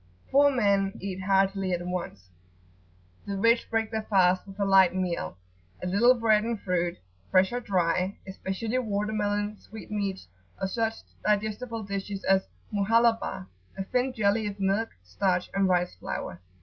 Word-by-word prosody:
Poor 285 +1 +6
men 200 -6 +2
eat 190 -1 -5
heartily 195 0 +2
at 175 0 -2
once. 170 - -5 1.0
The 200 -1 -2
rich 230 +4 +3
break 225 0 0
their 220 -1 -1
fast 185 -3 +2
with 195 +1 -11
a 200 - +2
light 190 -2 +5
meal, 170 - -2 0.4
a - - -6
little 220 +8 +5
bread 220 -3 +3
and 230 -1 -2
fruit, 175 -2 -1 0.3
fresh 185 0 +4
or 245 - -1
dry, 185 -3 0
especially 195 +5 -3
water 210 -2 -2
melon, 205 0 -1
sweetmeats, 205 - -5 0.3
or 190 - -1
such 225 +2 -1 0.3
digestible 215 +2 -1
dishes 200 0 -4
as 190 0 +2 0.3
"Muhallabah," 225 - +2 0.3
a 195 - -2
thin 250 +6 0
jelly 215 -2 +1
of 205 0 -6
milk, 195 +3 +1
starch, 180 - -1
and 195 -1 +2
rice 180 -1 +1
flour. 90 -1 -6
200 Hz, 150 wpm, -27 LUFS, 185-220 Hz, 1.0 s, Poor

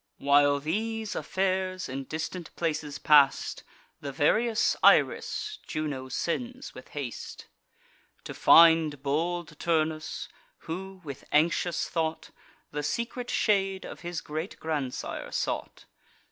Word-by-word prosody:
While 145 0 +4
these 220 +8 -2
affairs 185 -1 -1
in 135 +1 -5
distant 160 +3 -5
places 150 -3 -2
pass'd, 145 -3 +4 0.4
The 140 - -5
various 220 - +2
Iris 425 - +3
Juno 145 -4 -3
sends 245 - -3
with - - -11
haste, 130 -6 -6 0.8
To - - -7
find 160 -4 +6
bold 165 +2 -2
Turnus, 160 -2 -1 0.4
who, 190 +3 -6
with 140 -4 -8
anxious 170 +2 +2
thought, 160 -1 -2 0.4
The 150 - -3
secret 235 - -3
shade 195 -3 +1
of - - -8
his 175 -2 -5
great 155 +5 -5
grandsire 145 -5 -4
sought. - - -3
160 Hz, 110 wpm, -28 LUFS, 145-190 Hz, 0.8 s, find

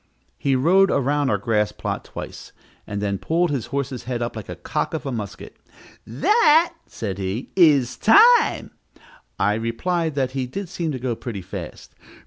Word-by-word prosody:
He 135 -1 +1
rode 185 +9 +4
around 140 +1 +1
our - - +2
grass 105 -3 0
plot - - -4
twice, - - -9 0.3
and 100 0 -4
then 100 -2 -1
pulled 170 0 0
his 135 -6 -2
horse's 140 -2 -4
head 125 -1 -3
up 120 - -4
like 110 -3 -7
the 90 - -6
cock 150 - -3
of 155 - -5
a 135 - -2
musket. 105 -5 -7 0.5
"That," 325 - +4
said 100 -4 -5
he, 95 +6 -4
"is 145 -9 +4
time." 465 - +5 0.7
I 105 +1 +2
replied 145 +9 -2
that 130 -3 0
he 130 -1 -3
did 195 +7 -6
seem 170 -3 -3
to - - -3
go 125 -1 -2
pretty 110 -5 -6
fast. - - -8
130 Hz, 170 wpm, -22 LUFS, 115-165 Hz, 0.7 s, time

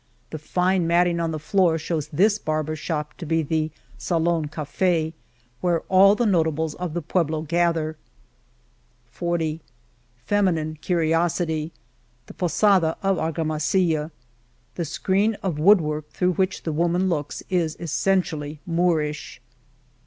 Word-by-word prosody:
The 155 - -5
fine 180 +3 +1
matting 170 0 +3
on 165 -1 0
the 160 - -3
floor 165 +1 +2
shows 160 -1 -3
this 200 +7 +2
barber's 155 -1 -2
shop 150 -2 -3
to 170 - -6
be 165 +1 +1
the 155 +1 -1 0.3
Salon 165 -2 0
Cafd,^* 160 +2 -1 0.5
where 175 -2 +1
all 195 +2 +6
the 240 - 0
notables 160 -5 +1
of 175 -2 -5
the 175 - -2
pueblo 160 -2 0
gather, 165 -1 0 1.2
jg 175 -1 -1
^^ 160 0 -2 0.7
Feminine 165 -7 0
curiosity?* 165 -1 0 0.5
The - - -12
Posada 180 -1 +2
of 195 -1 +2
Argamasilla, 160 0 0 0.6
The 170 - -3
screen 195 +7 0
of 175 -6 -2
wood 200 +6 +7
work 150 -1 -4
through 180 0 0
which 190 +2 -1
the 160 - -2
wom^ 170 +2 +1
an 185 +1 +1
looks 150 -5 -3
is 170 -4 0
essentially 165 -3 -1
Moorish 165 -3 -1
165 Hz, 135 wpm, -23 LUFS, 155-180 Hz, 1.2 s, wood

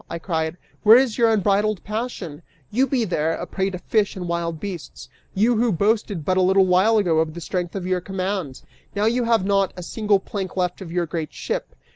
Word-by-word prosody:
I 170 - -4
cried. 160 -1 -2 0.2
"Where 220 +2 +8
is 255 -3 +1
your 230 -1 +5
unbridled 205 -1 +1
passion? 210 -8 -5 0.3
You 260 +5 +2
be 245 -3 0
there, 165 -4 0
a - - -4
prey 190 0 -2
to 185 - -5
fish 205 +3 0
and 180 -2 -5
wild 170 -1 -2
beasts, 175 -10 -7 0.3
you 225 +4 +3
who 235 +1 +2
boasted 205 -3 0
but 185 +3 +1
a - - +4
little 190 +1 +4
while 190 +5 +4
ago 175 -6 +2
of 160 0 -1
the - - -5
strength 175 +1 -3
of 190 -2 -4
your 185 -1 0
command. 185 -6 -4 0.3
Now 205 +1 +1
you 240 +2 +1
have 230 -4 +2
not 195 -1 +2
a 180 - -6
single 210 +1 +1
plank 190 -1 -5
left 180 +1 -1
of 175 -3 -7
your 175 0 0
great 160 -1 -4
ship! - - -4
190 Hz, 215 wpm, -22 LUFS, 170-215 Hz, 0.3 s, Where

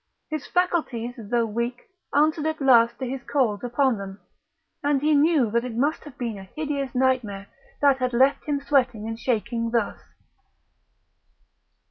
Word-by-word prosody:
His 310 -2 -4
faculties, 310 -10 0
though 230 +1 -1
weak, 235 +3 -3 0.3
answered 305 +1 +2
at 315 0 -2
last 235 -4 +5
to 260 - -4
his 265 +1 -4
calls 240 -8 0
upon 245 -1 +1
them; 195 0 -8 0.6
and 290 -1 +2
he 305 +2 +2
knew 290 -6 +3
that 235 +1 +1
it 250 -3 -5
must 290 +6 0
have 290 -4 -12
been 230 -5 -4
a 190 -1 -12
hideous 285 -4 -3
nightmare 250 -7 0 0.4
that 280 -2 +4
had 255 -1 0
left 260 +3 +3
him 290 -2 0
sweating 250 -6 +1
and 225 0 -5
shaking 235 -1 -1
thus. 230 -3 -1
250 Hz, 155 wpm, -24 LUFS, 230-285 Hz, 0.6 s, last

